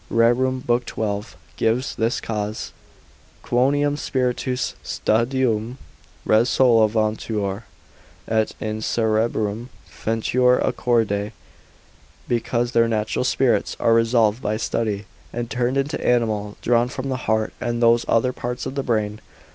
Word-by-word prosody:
12, 120 -3 0 0.2
gives 120 +4 0
this 115 +3 0
cause, 105 -1 -4 0.7
Quoniam 145 +4 +2
spiritus 125 -2 -1
sapientum - - -1
ob 115 +2 +3
studium 125 -2 -1 0.8
resolvuntur, 110 -3 +2 0.6
et 110 -1 +1
in 110 0 -3
cerebrum 110 0 0 0.2
feruntur 125 +3 +1
a - - 0
corde: 105 -4 0 1.0
because 120 0 0
their 115 -1 +3
natural 110 +1 -1
spirits 125 -4 +1
are 115 - +3
resolved 115 0 +3
by 105 +1 -1
study, 110 -2 -2 0.3
and 120 0 -4
turned 125 +2 0
into 140 +2 -1
animal; 110 -4 0
drawn 120 0 +3
from 130 +1 -5
the 130 - -1
heart, 110 0 +1
and 120 -1 -1
those 115 0 +4
other 125 +3 +2
parts 125 0 -4
to - - -3
the 140 +1 -2
brain. 110 -4 -1
115 Hz, 120 wpm, -22 LUFS, 110-125 Hz, 1.0 s, those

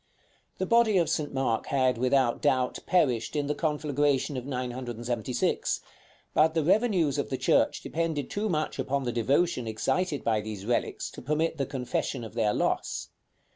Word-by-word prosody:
The 190 - -1
body 230 -1 +4
of 165 -3 +2
St. 150 -3 -1
Mark 130 -4 -1
had, 130 -3 +2
without 130 -1 +2
doubt, 130 -1 +1
perished 125 -10 +2
in 145 -1 0
the 145 - 0
conflagration 145 -3 0
of 130 0 -5
976; 120 -2 -2 0.5
but 160 +1 +4
the 160 - +2
revenues 185 - +2
of - - -2
the - - -2
church - - +2
depended 160 -3 -2
too 210 +1 -2
much 155 -4 -1
upon 135 +1 -1
the 120 - -1
devotion 125 +3 +1
excited 140 +8 -1
by 110 -2 +1
these 105 -2 -6
relics 120 +1 -1
to - - -10
permit 155 +4 -1
the 135 - 0
confession 130 -1 -2
of 110 - -8
their 110 -3 +2
loss. - - -1
135 Hz, 165 wpm, -28 LUFS, 120-155 Hz, 0.5 s, body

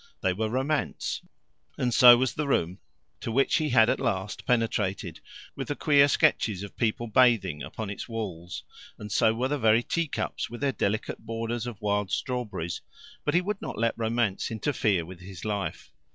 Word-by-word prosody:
They 95 - +2
were 110 +3 -2
Romance, 135 +5 -1 0.6
and 125 -1 0
so 120 0 +9
was 130 0 0
the 150 -1 -2
room 90 -7 0 0.4
to 115 - -4
which 135 +4 +3
he 155 -1 0
had 115 -3 +5
at 125 - +1
last 95 -2 -2
penetrated, 105 -7 0 0.4
with 135 -3 -5
the 145 - -2
queer 140 -2 +5
sketches 105 -7 +2
of 100 - -9
people 115 +1 0
bathing 110 -9 +3
upon 110 -3 -5
its 100 - -7
walls, 90 -7 -5 0.3
and 105 -1 -8
so 110 +3 +3
were 125 +3 0
the 145 +1 -1
very 110 0 +4
tea 170 +4 -1
cups, - - -3
with 120 - -8
their 140 -1 +2
delicate 110 -2 -2
borders 115 +1 -4
of 115 -5 -7
wild 105 -1 0
strawberries. 120 - -3 0.4
But 150 - 0
he 175 - +5
would 200 +2 -3
not - - -5
let 115 +1 +1
Romance 115 -3 0
interfere 110 - 0
with 90 +1 -11
his 90 0 -10
life. 100 -7 -3
115 Hz, 180 wpm, -27 LUFS, 100-125 Hz, 0.6 s, so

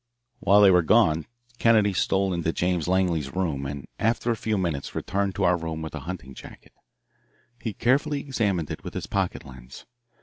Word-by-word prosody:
While 100 +1 +5
they 100 -2 +7
were 90 -1 +5
gone 80 0 +3 0.3
Kennedy 110 -3 +4
stole 95 +1 +1
into 85 -1 -1
James 90 -2 -1
Langley's 90 -6 0
room 80 -7 -1
and 70 0 -7
after 115 +2 +1
a - - 0
few 110 -1 -1
minutes 85 -7 -3
returned 100 0 -1
to - - -1
our 90 - +4
room 80 -1 -5
with 80 - -7
the 80 - -4
hunting 70 -8 -7
jacket. - - -13 0.9
He 110 - -3
carefully 140 +6 +1
examined 100 - -1
it - - -6
with - - -8
his - - -3
pocket - - -2
lens. 65 -1 -12
90 Hz, 180 wpm, -25 LUFS, 80-100 Hz, 0.9 s, they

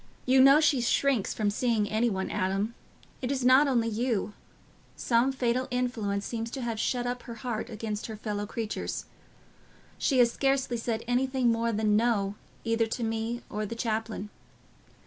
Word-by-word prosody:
"You 260 +1 +5
know 275 +3 +8
she 305 -5 +3
shrinks 245 -2 +1
from 210 -2 0
seeing 220 -1 +1
any 220 +3 +1
one, 190 -3 -3
Adam. 195 +3 -1 0.5
It 250 0 -2
is 265 -3 -1
not 260 +3 +6
only 235 -4 +2
you—some 230 +2 -2
fatal 255 -1 0
influence 225 -6 -1
seems 230 -1 -3
to 265 +2 -5
have 230 -3 -3
shut 245 +1 0
up 245 0 -2
her 235 - -8
heart 225 -1 -4
against 215 -1 -4
her 220 - -6
fellow 205 -1 -3
creatures. 220 0 -4 0.9
She 270 - +2
has 240 -2 +5
scarcely 270 -2 0
said 230 -1 -2
anything 255 0 +2
more 230 0 0
than 215 -1 +2
'No' 210 -3 +2 0.3
either 230 0 +1
to 235 +2 -3
me 225 +1 -2
or 210 +1 -3
the 215 +2 -4
chaplain. 220 -2 -3
230 Hz, 165 wpm, -28 LUFS, 215-250 Hz, 0.9 s, know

